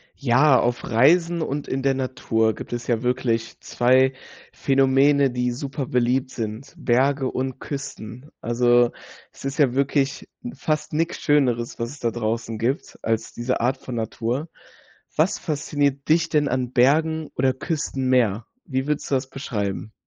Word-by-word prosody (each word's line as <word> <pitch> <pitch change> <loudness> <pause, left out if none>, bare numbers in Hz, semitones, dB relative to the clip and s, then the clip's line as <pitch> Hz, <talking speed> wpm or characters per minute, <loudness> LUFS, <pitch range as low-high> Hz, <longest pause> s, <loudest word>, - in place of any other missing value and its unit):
Ja, 130 +1 +4
auf 120 0 0
Reisen 165 +8 +3
und 145 -2 -3
in 135 - -2
der 135 0 +2
Natur 115 -4 0
gibt - - -9
es 120 0 -4
ja 115 -2 +1
wirklich 125 -2 -1
2 130 +2 +3 0.4
Phänomene, 135 +1 +3
die 125 0 -1
super 135 +1 -4
beliebt 125 +2 +1
sind: 115 +1 -6
Berge 135 +2 +2
und 130 0 -3
Küsten. 135 -2 -7
Also, 120 0 +3 0.4
es - - -15
ist 135 +1 -3
ja 140 -6 +3
wirklich 140 0 0 0.3
fast 155 -1 -2
nix 165 +2 -1
schöneres, 125 -6 +1
was 115 0 -2
es 145 +2 -11
da 115 -1 0
draußen 115 -1 -3
gibt 130 +5 -2
als 115 0 -2
diese 120 +2 -2
Art 130 +3 +1
von 125 - -7
Natur. 120 +6 -3 0.7
Was 160 +5 +2
fasziniert 145 -3 -1
dich 165 +2 +3
denn 150 -2 +2
an 125 -1 -1
Bergen 155 +5 +2
oder 130 0 +2
Küsten 135 -2 -3
mehr? 115 -4 +2 0.2
Wie 130 -5 -2
würdest 150 -1 -2
du - - +4
das 130 0 -2
beschreiben? 110 -6 -4
130 Hz, 155 wpm, -23 LUFS, 120-140 Hz, 0.7 s, Ja